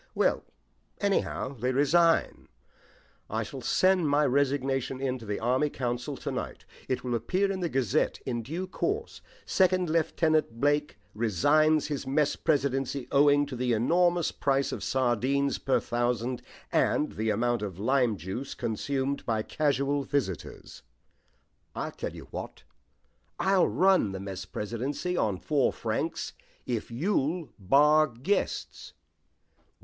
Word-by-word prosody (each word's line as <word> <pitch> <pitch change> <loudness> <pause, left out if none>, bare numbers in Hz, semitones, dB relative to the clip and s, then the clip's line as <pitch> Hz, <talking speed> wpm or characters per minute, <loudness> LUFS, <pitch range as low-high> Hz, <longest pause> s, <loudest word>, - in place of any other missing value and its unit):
"Well, - - +2 0.6
anyhow, 200 -9 0
they 125 0 -1
resign. 165 +5 +2 0.8
I - - -1
shall - - -8
send 185 -4 +3
my 145 +1 +3
resignation 135 -1 0
in 130 -1 -2
to 115 - -11
the 105 - -2
Army 130 +6 +1
Council 125 +2 -3
to - - -4
night. - - -5 0.2
It 130 - -1
will 125 -1 -2
appear 185 - 0
in 190 - -3
'The 175 -2 -1
Gazette' 135 +1 0
in 120 -3 -2
due 165 +11 -4
course. 410 - -3 0.2
'2nd 185 -2 +2
Lieut. 155 -5 +1
Blake 145 0 +1 0.2
resigns 145 - +3
his 145 -3 -4
mess 145 +2 +2
presidency 135 -3 0
owing 145 +1 +5
to 140 -2 -7
the 125 0 0
enormous 175 +8 +2
price 140 0 0
of - - -5
sardines 130 +2 +1
per 135 - +2
thousand 120 +1 -1 0.3
and 150 - +2
the 110 +1 -2
amount 120 +2 +1
of 100 -4 -5
lime 120 0 +2
juice 95 - -5
consumed 135 +5 -2
by 110 -2 0
casual 140 0 0
visitors.' 125 - -4 0.9
I'll - - -3
tell - - -6
you - - -10
what - - -7 0.7
I'll 190 -1 +3
run 185 - +3
the 95 - -5
mess 95 -2 -6 0.7
on 105 - 0
four 140 +7 +1
francs, - - -3 0.3
if 120 -4 -3
you'll 160 - -1
bar 150 +9 +5
guests." 135 - -3
135 Hz, 135 wpm, -28 LUFS, 120-155 Hz, 0.9 s, owing